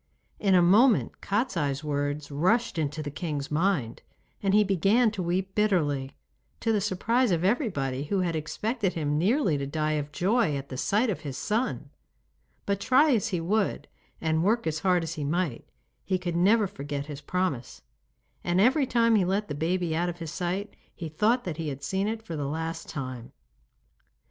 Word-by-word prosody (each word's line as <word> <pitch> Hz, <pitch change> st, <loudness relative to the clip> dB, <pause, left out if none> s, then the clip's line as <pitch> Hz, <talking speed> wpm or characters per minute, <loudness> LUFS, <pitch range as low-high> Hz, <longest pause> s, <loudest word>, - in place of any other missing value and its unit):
In 195 Hz, -2 st, +3 dB
a 175 Hz, -, +6 dB
moment 215 Hz, +7 st, +4 dB
Kostiei's 170 Hz, -, -1 dB
words 145 Hz, 0 st, -2 dB
rushed 185 Hz, +7 st, +1 dB
into 155 Hz, 0 st, -2 dB
the 145 Hz, -, -5 dB
king's 145 Hz, -2 st, -4 dB
mind, 150 Hz, -, 0 dB, 0.4 s
and 195 Hz, -, +1 dB
he 210 Hz, +1 st, +5 dB
began 200 Hz, +5 st, +3 dB
to 205 Hz, -3 st, -4 dB
weep 185 Hz, +2 st, -1 dB
bitterly, 150 Hz, -11 st, 0 dB, 0.4 s
to 225 Hz, -, +1 dB
the 210 Hz, -, +1 dB
surprise 225 Hz, +5 st, +1 dB
of 170 Hz, -2 st, +1 dB
everybody, 145 Hz, -, 0 dB
who 190 Hz, +5 st, 0 dB
had 170 Hz, -2 st, -1 dB
expected 200 Hz, -, -2 dB
him 150 Hz, -2 st, -1 dB
nearly 190 Hz, -, +2 dB
to 140 Hz, -, -3 dB
die 155 Hz, +1 st, -1 dB
of 145 Hz, +1 st, -9 dB
joy 190 Hz, -1 st, +1 dB
at 140 Hz, 0 st, -7 dB
the 130 Hz, -, -6 dB
sight 215 Hz, -, +1 dB
of 180 Hz, -, -4 dB
his 145 Hz, -4 st, -6 dB
son. 225 Hz, +5 st, -2 dB, 0.7 s
But 200 Hz, -1 st, 0 dB
try 260 Hz, +8 st, +4 dB
as 225 Hz, -1 st, +1 dB
he 185 Hz, -5 st, -1 dB
would 200 Hz, +5 st, 0 dB, 0.3 s
and 160 Hz, 0 st, +1 dB
work 225 Hz, +5 st, +2 dB
as 155 Hz, -1 st, -1 dB
hard 180 Hz, -1 st, +2 dB
as 165 Hz, 0 st, -4 dB
he 155 Hz, -3 st, -4 dB
might 155 Hz, -3 st, -2 dB, 0.4 s
he 185 Hz, -, 0 dB
could 175 Hz, -2 st, -3 dB
never 205 Hz, +5 st, +4 dB
forget 145 Hz, -7 st, -5 dB
his 145 Hz, -1 st, -8 dB
promise, 140 Hz, -, -3 dB, 0.6 s
and 175 Hz, +1 st, +1 dB
every 260 Hz, +6 st, +4 dB
time 230 Hz, -1 st, +3 dB
he 210 Hz, -4 st, +4 dB
let 195 Hz, +2 st, -1 dB
the -, -, -2 dB
baby 165 Hz, +2 st, -1 dB
out 175 Hz, +2 st, 0 dB
of 175 Hz, -, -6 dB
his 165 Hz, -3 st, -6 dB
sight 185 Hz, +4 st, -3 dB, 0.2 s
he 165 Hz, -3 st, -6 dB
thought 220 Hz, +10 st, +2 dB
that 170 Hz, -4 st, -4 dB
he 165 Hz, -2 st, -3 dB
had 140 Hz, 0 st, -7 dB
seen 190 Hz, +7 st, -1 dB
it 220 Hz, 0 st, -3 dB
for 170 Hz, -7 st, -6 dB
the 145 Hz, -2 st, -2 dB
last 160 Hz, +2 st, -4 dB
time. 130 Hz, -4 st, -6 dB
175 Hz, 190 wpm, -27 LUFS, 150-210 Hz, 0.7 s, a